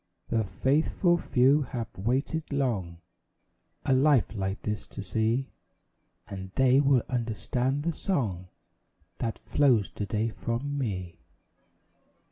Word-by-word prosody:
The 115 -1 +1
faithful 155 - +1
few 135 +4 +4
have 120 -4 -5
waited 135 - -1
long 100 -12 -1 0.8
A - - +3
life 135 -3 +4
like 95 -2 -3
this 105 -1 -3
to 100 - -7
see; 115 +6 0 0.8
And 95 -1 -7
they 130 0 +5
will 135 -4 +4
understand 125 +3 -1
the 170 +1 0
song 105 - -2 0.7
That 115 - -2
flows 125 -9 +2
to 105 - -4
day 110 +4 0
from 120 +6 -3
me. 95 -10 -3
120 Hz, 115 wpm, -28 LUFS, 105-140 Hz, 0.8 s, they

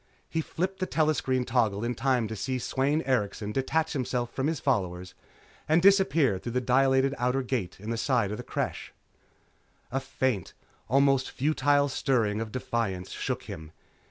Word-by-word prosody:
He 160 - -1
flipped 185 +5 -3
the 185 - -1
telescreen 135 -5 +1
toggle 115 -4 +1
in 120 +1 -1
time 125 -2 +1
to 110 - -5
see 130 +5 -2
Sweyn 135 +5 0
Erikson 105 -5 -1
detach 160 +7 0
himself 125 -3 -2
from 135 +1 -1
his 160 -3 -1
followers 90 -3 -1 0.6
and 160 +2 +5
disappear 165 - +4
through 120 +4 -6
the 125 - +2
dilated 130 +2 +3
outer 125 +2 +1
gate 120 -10 -3
in 105 +3 -5
the 115 - -1
side 115 -4 +1
of 105 - -3
the - - -6
Creche. - - -4 1.0
A 135 - 0
faint, 130 -7 -2 0.4
almost 135 0 +3
futile 145 0 +2
stirring 115 -6 0
of 110 -1 -5
defiance 110 -7 -2
shook - - -3
him. 80 0 -9
130 Hz, 160 wpm, -28 LUFS, 110-140 Hz, 1.0 s, and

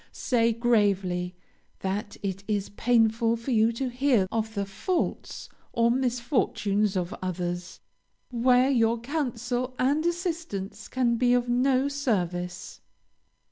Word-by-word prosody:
Say 230 -2 +1
gravely 200 -6 +1 0.5
that 200 +2 -3
it 195 0 -3
is 205 -2 -1
painful 225 +1 +2
for 230 +3 -5
you 225 -1 +4
to 260 +3 -2
hear 250 -5 +2
of 220 0 -2
the 200 0 -1
faults 335 - -3 0.3
or 235 0 +3
misfortunes 235 -5 0
of 180 -1 -2
others, 175 -1 -4 0.5
where 250 +2 +4
your 230 -2 +2
counsel 250 -2 -2
and 285 +4 +2
assistance 335 - -3
can 240 -2 +1
be 245 0 +3
of 245 0 +1
no 260 +2 +2
service. 180 -11 -2
230 Hz, 120 wpm, -27 LUFS, 200-255 Hz, 0.5 s, you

